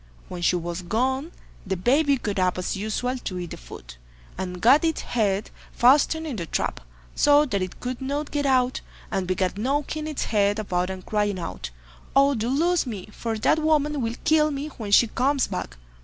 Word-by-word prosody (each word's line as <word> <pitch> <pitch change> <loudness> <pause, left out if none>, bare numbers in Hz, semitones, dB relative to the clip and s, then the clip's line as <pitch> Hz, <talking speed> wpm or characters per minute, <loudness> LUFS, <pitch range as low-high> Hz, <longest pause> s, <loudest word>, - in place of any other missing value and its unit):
When 180 -1 -6
she 175 - +3
was 175 +1 -3
gone 260 - -1 0.3
the 190 -1 -2
baby 280 - +3
got 205 -5 -3
up 185 -1 +1
as 180 - -2
usual 230 +5 -2
to 185 -6 -5
eat 175 -2 -5
the - - -6
food, - - -12 0.4
and 180 -1 -5
got 265 - +5
its 325 -1 0
head 205 -3 -1 0.2
fastened 295 +6 +4
in 280 -7 -4
the 170 -3 -4
trap, - - -2 0.3
so 290 +1 +5
that 200 -8 -1
it 185 -1 -5
could 250 0 -5
not 285 +3 -3
get 290 -1 0
out, 255 -1 +2 0.3
and 190 -2 -1
began 185 0 0
knocking 290 +6 -1
its 305 -3 -2
head 205 -1 +2
about 180 -4 -1
and 185 -1 -7
crying 205 -2 0
out, 90 - -5 0.5
"Oh! 275 +1 +5
do 230 -1 -2
loose 330 +3 +2
me, 210 -4 -6
for 225 +1 -3
that 310 - +2
woman 300 -2 +1
will 230 0 -2
kill 305 0 +4
me 290 +1 -4
when 225 -7 -7
she 220 - +7
comes 265 +4 +1
back." - - -5
235 Hz, 195 wpm, -25 LUFS, 185-285 Hz, 0.5 s, she